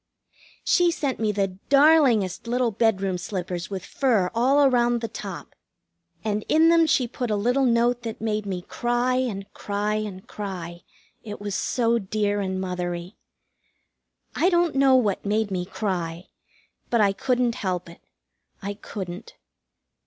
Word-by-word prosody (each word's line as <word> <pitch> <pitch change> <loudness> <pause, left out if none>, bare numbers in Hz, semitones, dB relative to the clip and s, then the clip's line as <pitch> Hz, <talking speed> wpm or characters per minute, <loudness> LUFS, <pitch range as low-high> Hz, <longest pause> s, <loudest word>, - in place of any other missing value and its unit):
She 355 -1 +4
sent 290 -5 -2
me 220 -1 +1
the 195 -2 -2
darlingest 275 - +4
little 245 0 +1
bedroom 195 -4 +1
slippers 180 -1 -4
with 190 -2 -5
fur 225 -10 +1
all 270 +5 +4
around 240 -2 +3
the 230 - -3
top. - - -8 0.7
And 210 -1 -1
in 320 +1 +5
them 335 -1 +5
she 265 -5 +2
put 245 0 -4
a 210 - +1
little 245 +6 +2
note 240 0 +2
that 230 -2 -6
made 215 -2 -2
me 180 -2 -3
cry 240 +3 0
and 220 -7 -2
cry 205 +1 -2
and 200 -3 -5
cry, 175 -4 -6 0.4
it 210 -2 -8
was 205 -1 -4
so 235 +4 +1
dear 205 0 -1
and 190 -1 -2
mothery. 180 0 -4 1.2
I 355 - +3
don't 345 -3 +2
know 270 -1 +5
what 215 -7 +1
made 210 0 0
me 180 -1 -2
cry, 180 -4 -3 0.6
but 235 - +2
I 200 -2 +4
couldn't 250 +2 +1
help 185 -7 -3
it. 170 - -14 0.6
I 200 +1 -4
couldn't. 195 -1 -8
215 Hz, 150 wpm, -24 LUFS, 190-245 Hz, 1.2 s, in